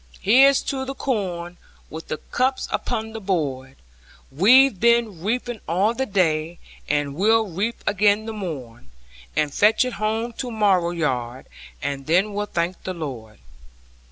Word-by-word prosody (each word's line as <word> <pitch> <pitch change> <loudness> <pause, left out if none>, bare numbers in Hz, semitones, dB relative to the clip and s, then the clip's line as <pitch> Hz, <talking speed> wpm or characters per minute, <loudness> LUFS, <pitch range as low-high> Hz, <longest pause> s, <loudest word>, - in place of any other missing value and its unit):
Here's 265 +6 +5
to 265 -1 -3
the 270 +1 -5
corn, 180 -10 -3 0.3
with 160 +1 -8
the 155 - -3
cups 260 +8 -1
upon 220 -2 -3
the 220 - -6
board! 140 -9 -2 0.6
We've 220 - +5
been 235 -6 +2
reaping 235 +2 -2
all 190 +7 +1
the 265 +2 -2
day, 170 -4 0 0.3
and 145 -1 0
we'll 220 +7 +3
reap 200 +6 -3
again 210 +1 +2
the 225 - -5
morn 135 - -7 0.5
And 150 -2 0
fetch 215 +4 +4
it 250 - -4
home 225 +2 -1
to 255 - -3
mow 200 -6 +2
yard, 130 -7 -3 0.4
and 140 0 -4
then 185 +6 +2
we'll 205 +1 -2
thank 175 -1 -2
the 185 - -4
Lord. 125 -10 -7
195 Hz, 150 wpm, -22 LUFS, 160-225 Hz, 0.6 s, Here's